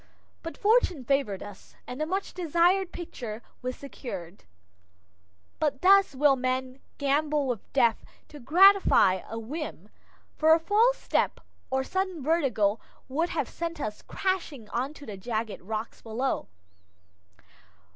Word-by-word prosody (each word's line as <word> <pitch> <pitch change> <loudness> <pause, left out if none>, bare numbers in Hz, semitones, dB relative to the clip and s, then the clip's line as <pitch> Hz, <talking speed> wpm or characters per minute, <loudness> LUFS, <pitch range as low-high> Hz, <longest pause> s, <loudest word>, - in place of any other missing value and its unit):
But 330 - -7
fortune 405 - +2
favored 275 -8 0
us, 205 -1 -12
and 250 +4 -6
the 310 - 0
much 385 +3 -2
desired 355 +2 +2
picture 240 -11 -7 0.2
was 255 0 -3
secured. 200 - -8 1.1
But 285 -2 -1
thus 390 -5 +6
will 280 0 +4
men 255 0 -2 0.2
gamble 290 +1 +1
with 245 -5 -4
death 235 -4 +2 0.3
to 295 - -11
gratify 310 - +5
a 225 - -5
whim, 290 +8 -6 0.5
for 320 +1 +5
a - - 0
false 435 +9 +3
step - - 0 0.3
or 265 0 0
sudden 375 -1 -2
vertigo 250 -10 +1 0.3
would 320 +6 -1
have - - -1
sent 335 -1 -5
us 215 -6 -4
crashing 335 - -3
on 265 +5 -2
to 290 - -11
the 210 -3 -7
jagged 220 +1 -3
rocks 215 +4 -5
below. 240 +4 -2
280 Hz, 135 wpm, -27 LUFS, 235-335 Hz, 1.1 s, thus